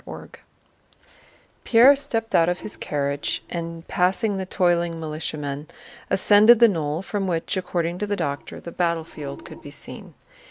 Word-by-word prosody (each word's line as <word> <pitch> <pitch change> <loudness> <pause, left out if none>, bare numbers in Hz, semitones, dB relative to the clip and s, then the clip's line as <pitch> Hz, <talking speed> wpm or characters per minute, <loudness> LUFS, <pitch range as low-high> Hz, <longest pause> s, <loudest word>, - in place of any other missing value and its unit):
CHAPTER - - -8
XXI - - -11 1.3
Pierre 250 +4 +7
stepped 225 -5 -3
out 165 0 +4
of 180 - -2
his 215 - -6
carriage 140 -1 -2
and, 165 -1 -5
passing 195 +3 +1
the 190 -1 -4
toiling 175 -3 +1
militiamen, 150 -2 -5 0.4
ascended 210 +4 +6
the 235 +1 +7
knoll 160 -3 -2
from 195 -1 -2
which, 165 0 -1
according 175 -2 -2
to 210 - -2
the 205 - 0
doctor, 145 -7 -4
the 170 - -9
battlefield 165 -5 -3
could - - -11
be - - -10
seen. - - -10
175 Hz, 155 wpm, -23 LUFS, 160-205 Hz, 1.3 s, Pierre